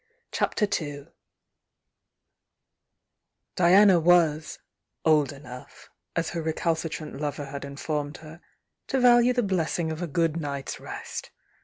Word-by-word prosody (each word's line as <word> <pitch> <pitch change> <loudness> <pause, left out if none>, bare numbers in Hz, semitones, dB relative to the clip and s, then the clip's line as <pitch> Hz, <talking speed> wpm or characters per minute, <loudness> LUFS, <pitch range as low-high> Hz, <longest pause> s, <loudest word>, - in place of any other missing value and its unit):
CHAPTER 210 - 0
II 145 -2 -7 2.5
Diana 185 +1 +6
was 160 -2 +3 0.5
"old 150 -4 +4
enough," 135 -1 -12 0.2
as 165 -1 -1
her 170 - -3
recalcitrant 160 -2 -3
lover 145 -1 -3
had 140 0 -7
informed 145 +1 -4
her, 160 +2 -13 0.5
to 270 - 0
value 245 0 +6
the 245 -1 +1
blessing 170 -4 -1
of 160 +2 -5
a 175 - -2
good 165 +1 0
night's 140 -4 -4
rest. - - -7
160 Hz, 115 wpm, -26 LUFS, 145-175 Hz, 2.5 s, Diana